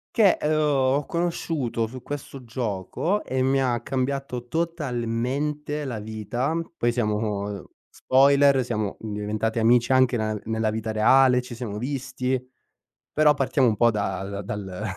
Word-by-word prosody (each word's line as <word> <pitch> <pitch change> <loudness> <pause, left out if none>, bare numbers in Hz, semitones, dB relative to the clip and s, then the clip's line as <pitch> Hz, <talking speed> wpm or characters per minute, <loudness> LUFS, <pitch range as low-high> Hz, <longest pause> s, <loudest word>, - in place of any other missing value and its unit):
che, 205 -5 +5
ehm, 150 - 0
ho 140 -1 +2
conosciuto 160 -9 -1
su 130 +1 -10
questo 140 -2 -7
gioco 115 - -2
e 130 0 -2
mi 135 +1 +2
ha 120 -3 0
cambiato 130 -2 -3
totalmente 145 -1 -2
la 125 -4 -4
vita. 110 +7 -3 0.2
Poi 120 - +2
siamo 105 -3 -2 0.2
spoiler, 140 0 +4
siamo 105 -4 -2
diventati 110 +1 -3
amici 120 +2 +4
anche 130 -1 +4
nella 110 -2 -1
nella 110 0 0
vita 110 0 -3
reale, 125 +4 +5
ci 125 -1 -9
siamo 110 -4 -5
visti, 130 -1 -2 0.7
però 150 -1 +4
partiamo 135 -1 +2
un 110 - +2
po' 120 +2 +4
dal 100 -1 -3
dal 100 -1 -5
125 Hz, 135 wpm, -25 LUFS, 110-135 Hz, 0.7 s, che